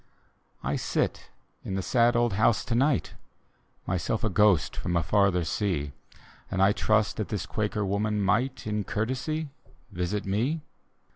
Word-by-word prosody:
I - - -1
sit - - -2 0.3
in 95 - -4
the 95 - -2
sad 120 +4 +3
old 120 -2 +2
house 110 +3 +2
to 120 - -2
night 135 +4 +1 0.4
— - - -40
Myself 95 +4 -1
a 110 - +1
ghost 105 -5 +3
from 85 0 -2
a 85 - +2
farther 95 0 +2
sea; 80 -6 -1 0.6
And 95 - -2
I 95 +1 +5
trust 110 0 +1
that 110 - -2
this 105 - -3
Quaker 105 -2 -2
woman 105 +2 0
might, 115 +7 0
In 105 -1 -1
courtesy, 130 +10 -2 0.4
visit 95 +2 -2
mc. 120 +12 0
105 Hz, 155 wpm, -27 LUFS, 95-115 Hz, 0.6 s, I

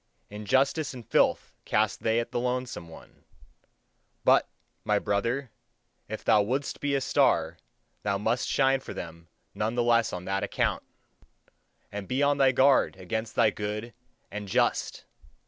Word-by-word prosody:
Injustice 135 +8 0
and 120 -4 -10
filth - - +2
cast 105 -1 0
they 110 +1 +2
at 115 - -4
the - - -1
lonesome 125 -7 -3
one: 80 - -15 1.0
but, - - +4 0.3
my - - +2
brother, 115 +5 -1 0.6
if 110 - -6
thou 105 - +5
wouldst 130 +7 -2
be 145 -1 0
a - - +2
star, - - +2 0.4
thou 100 -1 0
must 115 +4 -1
shine 135 -1 +3
for - - -9
them 85 -1 -8 0.3
none 110 +3 -2
the 120 - +2
less 115 -1 +3
on 90 0 -6
that 95 +1 -1
account! - - -1 1.1
And 100 -1 -6
be 130 +3 0
on 145 0 +2
thy 135 -1 +5
guard 135 -3 +4
against 110 +5 -4
the 110 - +4
good 105 +3 -5 0.4
and 105 0 -6
just! 95 - 0
115 Hz, 150 wpm, -28 LUFS, 105-130 Hz, 1.1 s, thou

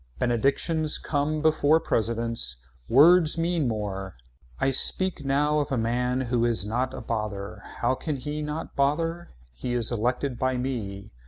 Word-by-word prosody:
Benedictions 140 +6 +1
come 150 +1 -1
before 155 0 +4
presidents. 115 - -1 0.3
Words 160 +5 +6
mean 165 -3 0
more. 100 - -4 0.4
I 135 - +2
speak 185 +5 +2
now 145 +2 +2
of 145 - -2
a 130 - +1
man 125 +3 0
who 120 -2 0
is 115 -5 +2
not 125 +5 -2
a - - -6
bother. 105 -3 -4 0.2
How 120 +2 +2
can 150 +3 -3
he 150 +3 -4
not 150 +2 -5
bother. 165 +5 0 0.2
He 120 - -5
is 120 -1 +1
elected 125 +3 -1
by 130 -1 0
me. 110 -6 -4
130 Hz, 150 wpm, -26 LUFS, 115-150 Hz, 0.4 s, Words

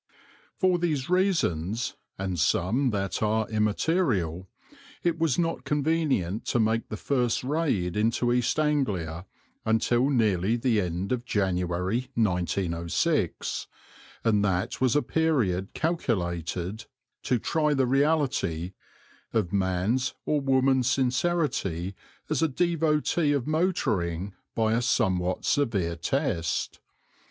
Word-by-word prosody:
For 185 -1 +2
these 155 -4 -1
reasons, 125 - +1 0.2
and 95 -3 -3
some 105 - +2
that 100 -4 -2
are 110 0 +1
immaterial, 105 - 0 0.5
it 170 -1 0
was 160 -5 +2
not 165 -1 -1
convenient 145 - 0
to 120 - 0
make 110 +1 +1
the 110 - -4
first 125 -3 0
raid 130 - 0
into 115 +3 +1
East 125 +4 +1
Anglia 100 - -1 0.4
until 120 +4 +2
nearly 110 -5 +2
the 115 -3 +1
end 90 +2 -3
of 125 -2 0
January, 95 +2 -1
1906, 90 -4 0 0.6
and 105 -3 +3
that 95 +1 -1
was 130 -1 +3
a 145 - +3
period 120 - 0
calculated 95 - -2 0.4
to 125 - +1
try 150 +5 +1
the 135 -1 +2
reality 135 - +1 0.6
of 105 -6 0
man's 100 +7 0
or 150 -1 +1
woman's 130 -2 +3
sincerity 125 - 0 0.3
as - - 0
a 160 - +4
devotee 155 0 +1
of 140 -4 -1
motoring 100 - 0 0.2
by 110 -1 +2
a 115 - +2
somewhat 95 -7 0
severe 100 -12 +1
test. 85 - -1
115 Hz, 115 wpm, -27 LUFS, 95-145 Hz, 0.6 s, a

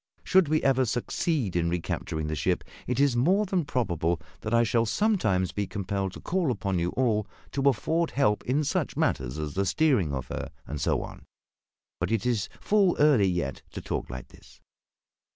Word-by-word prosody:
Should 190 -4 +4
we 155 +1 +1
ever 130 -1 +3
succeed 120 - -1
in 85 -1 +1
recapturing 80 -2 -3
the 75 - -2
ship - - 0 0.2
it 125 +1 -1
is 140 -3 +3
more 185 +12 +3
than 185 -4 0
probable 85 - 0 0.2
that 110 - -5
I 115 0 +4
shall 115 0 +1
sometimes 110 - +1
be 100 -1 -2
compelled 100 -1 -3
to - - -9
call 175 -4 0
upon 100 -6 -1
you 85 +1 0
all 110 -5 +1 0.2
to 140 0 +3
afford 160 +8 0
help 130 -7 +1
in 140 +5 +1
such 140 - -1
matters 65 +1 0
as 75 -1 -4
the 100 - +1
steering 105 - +2
of 65 -3 -3
her, - - -4 0.2
and 75 -1 -5
so - - +1
on. - - -10 0.7
But - - -1
it 115 -2 0
is 115 -4 0
full 200 -4 +3
early 140 -9 +5
yet 85 -7 -2
to - - -5
talk - - -3
like 65 0 -7
this." - - -18
115 Hz, 190 wpm, -27 LUFS, 90-145 Hz, 0.7 s, early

